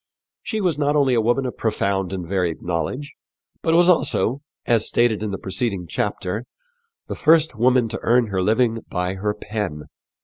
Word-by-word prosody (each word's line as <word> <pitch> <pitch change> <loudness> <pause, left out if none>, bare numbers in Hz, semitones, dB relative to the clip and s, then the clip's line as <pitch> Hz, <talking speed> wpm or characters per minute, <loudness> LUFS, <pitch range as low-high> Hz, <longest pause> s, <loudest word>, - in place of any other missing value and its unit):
She 220 -2 -3
was 170 -6 0
not 145 0 +1
only 140 -3 +3
a 115 - +3
woman 120 +4 +1
of 125 - -5
profound 100 -4 -1
and 90 -3 -5
varied 90 -3 -1
knowledge, 90 - -3 0.5
but 165 0 +2
was 175 +1 +5
also, 145 -6 +2 0.2
as 115 -2 +3
stated 120 -3 +2
in 110 - -2
the 95 - -3
preceding 95 -1 -3
chapter, 95 +8 -3 0.6
the - - -5
first 160 -1 +3
woman 125 +1 +3
to - - -4
earn 120 -1 +3
her 95 -2 -1
living 115 +3 +2
by 90 0 -2
her 105 +2 -2
pen. 105 -8 -4
110 Hz, 175 wpm, -22 LUFS, 95-130 Hz, 0.6 s, was